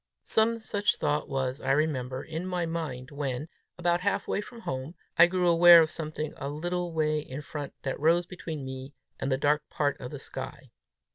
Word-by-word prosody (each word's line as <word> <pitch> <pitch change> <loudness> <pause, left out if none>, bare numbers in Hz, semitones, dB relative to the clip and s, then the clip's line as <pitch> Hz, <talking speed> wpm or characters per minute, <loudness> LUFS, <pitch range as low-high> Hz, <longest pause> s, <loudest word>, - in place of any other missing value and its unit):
Some 230 +1 +2
such 205 -1 +1
thought 150 +1 -1
was, 135 -1 -2
I - - +2
remember, 130 -3 0
in 160 +3 -5
my 180 -2 -1
mind, 150 -6 -4
when, 140 0 -3 0.3
about 175 0 +1
halfway 200 +1 0
from 230 +2 -11
home, 130 -1 -4 0.2
I 170 - +8
grew 180 0 +1
aware 170 0 +9
of 160 0 +3
something 155 -1 -4
a 140 0 -4
little 175 +4 -2
way 155 -1 +1
in 150 0 -7
front 145 -1 -6
that 135 - -2
rose 165 +3 +3
between 160 -5 -6
me 130 +1 -7 0.2
and 135 - -1
a 130 - +3
dark 150 +2 +1
part 145 -2 0
of 125 - -5
the - - -6
sky. - - -8
155 Hz, 190 wpm, -28 LUFS, 140-175 Hz, 0.3 s, aware